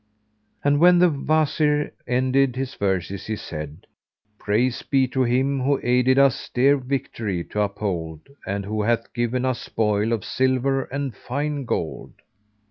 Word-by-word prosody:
And 145 0 +3
when 175 +2 +6
the 175 -1 +5
Wazir 150 0 +1 0.2
ended 130 +1 +2
his 135 +1 -3
verses, 95 -1 -2
he 110 - -2
said, 75 -3 -8 0.5
"Praise 120 +4 0
be 135 -1 +1
to 130 +1 -1
Him 135 +3 +1
who 140 +1 +1
aided 125 +2 +3
us 140 -2 +3
dear 135 +3 +4
victory 115 -8 -3
to 105 - 0
uphold 90 -6 -3 0.3
and 100 0 -2
who 105 +1 -2
hath 115 +2 0
given 120 +2 -1
us 130 -2 -1
spoil 105 0 0
of 115 -5 -1
silver 130 +1 +1
and 140 -4 -4
fine 145 +3 -3
gold!" 80 - -3
125 Hz, 145 wpm, -23 LUFS, 105-135 Hz, 0.5 s, when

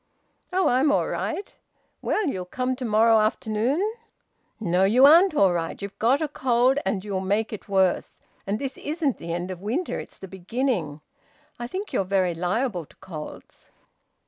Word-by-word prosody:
"Oh! 370 -2 +2
I'm 270 +3 +3
all - - +2
right. 395 - -3 0.5
Well, 430 - 0
you'll 190 - -2
come 255 +7 -2
to 255 - -4
morrow 225 0 +4
afternoon?" 235 - 0 0.7
"No, 185 -3 +1
you 235 +7 +6
aren't 335 +4 +7
all 195 -9 +4
right. 165 -1 -3
You've 200 -1 -8
got 260 +7 +3
a - - 0
cold 255 -1 +2
and 195 -1 -1
you'll 195 -2 -2
make 205 +4 -1
it 215 - -8
worse, 190 -2 +1 0.3
and 200 +2 0
this 270 +2 -5
isn't 300 -3 -1
the 165 - -6
end 175 +2 -3
of 180 -1 -7
winter, 245 - -2
it's - - -10
the 190 - -9
beginning; 190 - -2 0.6
I 240 - -4
think 385 - -6
you're - - +2
very 185 -2 +1
liable 180 - -1
to - - -22
colds." 155 -5 -10
220 Hz, 170 wpm, -25 LUFS, 190-270 Hz, 0.7 s, aren't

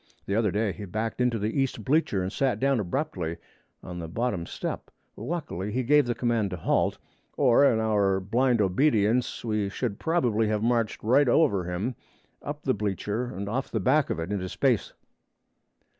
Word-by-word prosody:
The 100 - -2
other 110 -1 +2
day 105 +2 0
he 105 +2 -7
backed 110 +6 -3
into 125 -2 +2
the 110 +6 0
east 125 -4 -2
bleacher 130 - +2
and 95 +3 -4
sat 135 -2 0
down 135 -2 +2
abruptly 90 - -3 0.5
on 90 -1 -7
the 85 - -5
bottom 95 -2 -2
step. - - -5 0.3
Luckily 115 - -4
he 130 +4 -1
gave 145 +1 +4
the 120 - -1
command 115 -4 0
to 90 - -5
halt, 80 - +1 0.4
or 130 -1 +5
in 110 - +1
our 100 -3 +2
blind 115 +4 +1
obedience 115 +3 +1
we 105 -3 0
should 105 0 -3
probably 120 -10 +1
have 105 0 0
marched 115 -2 0
right 130 +5 +4
over 120 - +3
him 90 +8 -2 0.5
up 145 +1 -6
the 130 - +2
bleacher 105 +3 -2
and 100 -5 -6
off 130 +6 -2
the 110 - -1
back 140 +8 +2
of - - -2
it 80 +4 -4
into 95 -3 -2
space. - - +1
110 Hz, 180 wpm, -27 LUFS, 100-125 Hz, 0.5 s, or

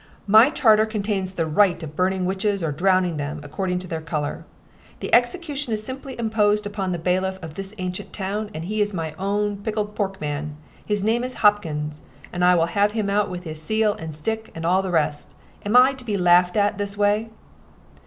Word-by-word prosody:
"My 220 +6 +7
charter 220 -6 +4
contains 200 -3 -2
the 165 -3 -1
right 175 +2 +2
of 155 -1 -8
burning 185 +1 +1
witches 195 +1 -1
or 160 - 0
drowning 180 +1 +2
them, 145 +1 -4
according 180 +5 -2
to - - -10
their 160 -2 -4
color. 155 -2 -4 0.5
The - - -6
execution 295 -8 +1
is 215 0 -2
specially 265 +3 -6
imposed 210 -2 +1
upon 200 -2 -3
the 175 - -1
bailiff 185 +2 0
of 160 -1 -7
this 195 +4 -7
ancient 185 -1 -5
town, 205 +2 -3
and 165 -5 -6
he 215 +3 -1
is 205 -1 0
my 160 -2 -3
own 205 +1 -1
pickled 210 0 -3
pork 195 -2 -3
man. 150 0 -4 0.3
His 210 -2 -1
name 230 +3 +1
is 255 0 -4
Hopkins, 155 -8 +1 0.3
and 180 0 -1
I 180 0 +6
will 165 -1 +3
have 205 +4 +1
him 210 -3 -1
out 205 +1 +1
with 180 -1 -6
his 155 -2 -7
seal 215 +4 +1
and 160 -7 -7
stick 220 +8 -3
and 165 0 -5
all 185 +3 +3
the 190 - -4
rest. 150 -3 -1 0.3
Am 205 +3 -1
I 255 +2 +7
to 260 -1 -9
be 210 -4 -2
laughed 180 +1 +4
at 205 0 +3
in - - -15
this 200 0 -3
way?" 210 +2 +1
195 Hz, 210 wpm, -23 LUFS, 170-210 Hz, 0.5 s, My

